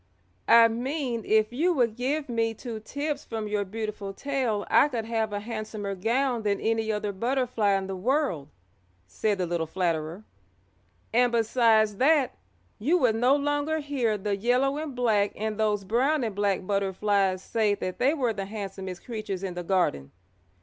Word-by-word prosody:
"I 230 0 +8
mean 245 0 -2
if 215 +1 +3
you 340 +8 +2
would 240 -7 +1
give 280 +5 -1
me 225 -2 -1
two 230 -1 -6
tips 285 +7 -4
from 220 -2 -4
your 210 -1 0
beautiful 210 -1 -5
tail 255 -7 -1
I - - +5
could 235 -6 -3
have 225 -1 -1
a 205 - -2
handsomer 215 -2 -5
gown 235 +5 0
than 205 -2 0
any 225 0 0
other 210 -1 -2
butterfly 235 -1 0
in 195 - -3
the 190 0 -4
world," 230 - 0 0.6
said 205 - -1
the 185 - -1
little 170 -1 -2
flatterer, 165 +1 -2 0.9
"and 245 +1 +4
besides 225 -2 +3
that, 280 0 +3 0.4
you 305 +11 +2
would 250 -9 +3
no 250 +4 +4
longer 290 +2 0
hear 270 -8 -1
the 205 0 -1
yellow 250 +7 +1
and 305 -4 -5
black 215 -5 +2
and 215 0 -3
those 210 -2 +1
brown 255 +8 +1
and 220 -3 -2
black 200 -2 0
butterflies 195 -1 0
say 215 -3 +1
that 185 -2 -5
they 275 +5 +3
were 250 -6 0
the 195 -2 -4
handsomest 195 -3 -6
creatures 215 -5 -5
in 190 -2 -3
the 175 - -4
garden. 170 - 0
220 Hz, 170 wpm, -27 LUFS, 200-250 Hz, 0.9 s, I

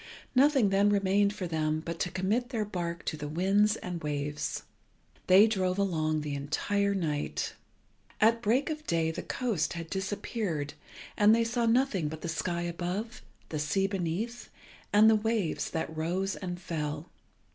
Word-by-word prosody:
Nothing 270 -4 +5
then 200 +1 +4
remained 200 0 +3
for 200 -3 -5
them 155 -2 0
but 170 -1 -4
to 180 - 0
commit 210 +8 0
their 225 -5 -1
bark 170 -4 -4
to - - -1
the 150 -1 -5
wind 195 +7 +2
and 175 -2 -4
waves. 145 0 -3 0.6
They 190 +3 +8
drove 190 -4 0
along 155 -6 +1
the 150 -1 -4
entire 200 +8 0
night. 150 -6 -2 0.7
At 230 +2 +4
break 250 +8 +2
of 305 0 -6
day 165 -1 +1
the - - -5
coast 230 - -1
had 165 -1 -7
disappeared, 190 -5 -2 0.4
and 210 +1 +6
they 230 - +2
saw 235 0 0
nothing 225 - +2
but 155 +1 -6
the 170 - -4
sky 170 +1 -2
above, 180 +7 -4 0.3
the 155 - -3
sea 150 +7 +1
beneath, 195 +5 -3 0.4
and 210 +2 +7
the 220 - +7
waves 215 -5 0
that 160 0 -3
rose 180 +5 -1
and 180 -2 -5
fell. 155 -2 -4
190 Hz, 160 wpm, -30 LUFS, 160-215 Hz, 0.7 s, They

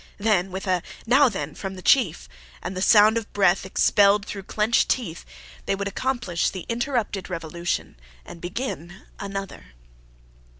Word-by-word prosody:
Then, 200 -3 +1
with 190 +2 -6
a 185 -2 +1 0.2
"Now, 265 +3 +5
then!" 150 -8 -5
from 195 -1 -6
the 185 - -10
chief, 195 - +3 0.4
and 185 - -4
the 185 - -3
sound 215 +2 +6
of 225 - -9
a - - -32
breath 190 -2 +3
expelled 200 +1 +4
through 200 - -6
clenched 215 +2 +2
teeth, 180 -10 -2 0.4
they - - +1
would 200 0 -3
accomplish 240 -5 -1
the 185 -3 -7
interrupted 235 -6 -2
revolution 170 - -4 0.3
and 170 - -11
begin 180 -3 -5 0.2
another. 195 - -7
195 Hz, 155 wpm, -24 LUFS, 175-220 Hz, 0.4 s, sound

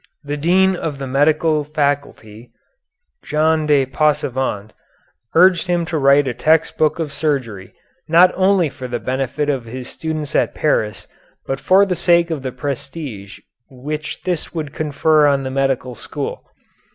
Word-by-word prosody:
The 145 0 -4
dean 185 +5 +3
of 160 -5 -4
the 135 - -5
medical 150 +3 +2
faculty, 140 -7 -3 0.7
Jean 155 0 +1
de 145 -3 +3
Passavant, 130 -6 -1 0.6
urged 180 +1 +5
him 175 -1 0
to 160 0 -3
write 140 0 +4
a 125 - -1
text 160 +5 +2
book 155 0 +1
of 155 -4 -4
surgery, 135 -10 -3 0.3
not 175 +3 +6
only 190 -2 +3
for 130 -2 -8
the 120 -1 -3
benefit 130 +5 -2
of 135 -5 -1
his 125 +2 -7
students 155 -2 -5
at - - +1
Paris 110 -9 -1 0.4
but 135 0 -3
for 190 +6 +4
the 190 - -1
sake 170 -1 +2
of 155 -4 -3
the 130 -1 -4
prestige 130 -5 -6 0.3
which 150 +4 -6
this 175 -2 -3
would 150 -4 -4
confer 155 0 +2
on 140 -1 +1
the 130 - -4
medical 135 -2 -1
school. 105 - -6
145 Hz, 150 wpm, -19 LUFS, 130-160 Hz, 0.7 s, not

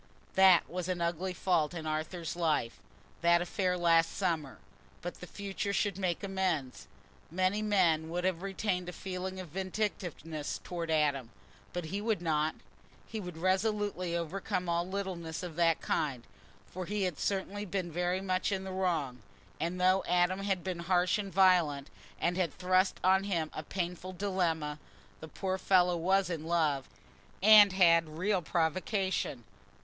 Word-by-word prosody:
That 190 -2 +6
was 180 0 -4
an 180 -1 -2
ugly 170 +2 -1
fault 175 -2 0
in 160 -2 -5
Arthur's 155 +2 -3
life, 155 -9 0 0.4
that 170 0 +5
affair 180 +1 -1
last 165 -1 +3
summer, 165 -8 -1 0.5
but 175 - -6
the 180 - -7
future 200 +1 -4
should 200 -1 0
make 180 -2 -1
amends. 185 -9 -2 0.4
Many 185 +4 +1
men 175 -7 +2
would 175 +2 -2
have 180 -2 0
retained 190 -2 -2
a - - -7
feeling 185 0 -5
of 180 -3 -7
vindictiveness 180 -4 -3
towards 170 -2 -4
Adam, 145 -6 +1 0.4
but 175 -2 -4
he 200 - -1
would 220 -3 0
not—he 160 +6 -4
would 180 -5 -7
resolutely 190 -1 0
overcome 180 +2 -3
all 170 +1 0
littleness 185 -4 -4
of 175 -3 -6
that 165 -2 +3
kind, 135 -7 -1 0.4
for 185 -1 -7
he 205 0 -1
had 180 -6 -2
certainly 200 +1 -2
been 185 -3 -3
very 180 +3 0
much 185 +1 0
in 190 -1 -1
the 190 - -6
wrong; 165 -9 -1 0.4
and 170 +4 -2
though 185 +1 +4
Adam 180 +2 +2
had 195 -3 -1
been 185 -2 -3
harsh 180 +2 +2
and 200 -2 -4
violent, 170 -7 +3 0.3
and 175 +1 0
had 180 -5 +1
thrust 185 +1 +2
on 190 +1 +4
him 170 -6 -1
a - - -4
painful 180 +2 -4
dilemma, 170 -6 -1 0.4
the 160 - -8
poor 190 +4 -3
fellow 180 -2 +4
was 190 +3 +2
in 165 -3 -4
love, 155 -5 0 0.5
and 210 -2 +9
had 165 -4 +4
real 190 +1 +1
provocation. 175 - -1
180 Hz, 155 wpm, -31 LUFS, 165-190 Hz, 0.5 s, and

